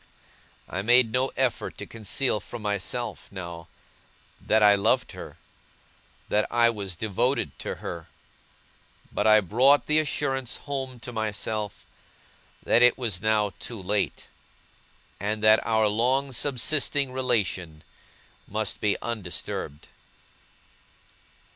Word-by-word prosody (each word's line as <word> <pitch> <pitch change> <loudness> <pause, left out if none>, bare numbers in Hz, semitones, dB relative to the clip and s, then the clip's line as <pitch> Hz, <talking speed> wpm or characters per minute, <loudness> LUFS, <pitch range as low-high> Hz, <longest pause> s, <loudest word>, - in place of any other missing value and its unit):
I 95 - -3
made 120 +2 +4
no 130 +2 +1
effort 130 -2 -1
to - - -6
conceal 115 +2 0
from 110 +2 -8
myself, 105 +4 -2
now, 85 -3 -7 0.7
that 110 0 +3
I 105 -1 +8
loved 100 -1 +1
her, - - -10 0.9
that 105 +1 +1
I 115 0 +4
was 100 -5 -5
devoted 110 - 0
to - - -4
her; 85 -2 -7 1.0
but - - 0
I 110 0 +7
brought 130 +9 +4
the 155 0 +3
assurance 135 -4 -1
home 135 -3 -4
to 125 - -7
myself, 110 -1 -3 0.8
that 120 - +3
it 125 0 +6
was 110 -8 -2
now 105 -2 +1
too 115 -3 -7
late, 100 +2 -1 0.9
and 105 +2 -2
that 110 0 +6
our 110 -1 +2
long 130 +6 +1
subsisting 140 +1 +1
relation 100 -11 -1 0.6
must 105 -1 -3
be 105 -1 +2
undisturbed. 90 -8 -4
110 Hz, 115 wpm, -26 LUFS, 100-125 Hz, 1.0 s, I